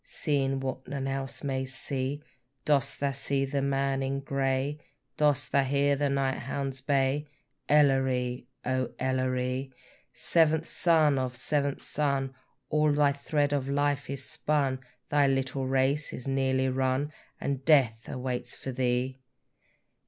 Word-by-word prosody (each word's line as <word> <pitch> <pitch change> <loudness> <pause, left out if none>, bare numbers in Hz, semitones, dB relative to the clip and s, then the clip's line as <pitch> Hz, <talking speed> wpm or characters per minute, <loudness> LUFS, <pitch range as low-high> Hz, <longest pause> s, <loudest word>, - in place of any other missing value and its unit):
Seeing 135 -3 0
what 130 0 -4
none 135 -1 -3
else 135 -1 -3
may 135 -2 -1
see, 130 +2 -4 0.4
Dost 140 -2 +1
thou 140 0 +1
see 135 0 -1
the 140 +1 -1
man 135 0 0
in 135 +1 -1
grey? 135 +1 -1 0.4
Dost 145 -2 +2
thou 140 - +4
hear 140 +1 +2
the 145 0 0
night 135 -1 0
hounds 135 +1 -3
bay? 140 +1 +1 0.4
Elleree! 130 -4 +3 0.2
O 130 -1 0
Elleree! 130 0 -1 0.4
Seventh 160 -1 +2
son 155 -5 +3
of 130 -1 -2
seventh 140 +2 -1
son, 140 -2 -1 0.4
All 150 0 +3
thy 145 -1 +4
thread 145 +1 0
of 135 -1 -1
life 145 -1 0
is 140 -1 -4
spun, 140 -3 0 0.3
Thy 145 -1 +4
little 135 0 0
race 135 +3 +1
is 125 - -7
nearly 130 -1 +1
run, 130 +3 0 0.3
And 140 -1 -2
death 130 -7 +3
awaits 125 -2 -4
for 135 - -6
thee! 125 +1 0
135 Hz, 135 wpm, -29 LUFS, 130-145 Hz, 0.4 s, thou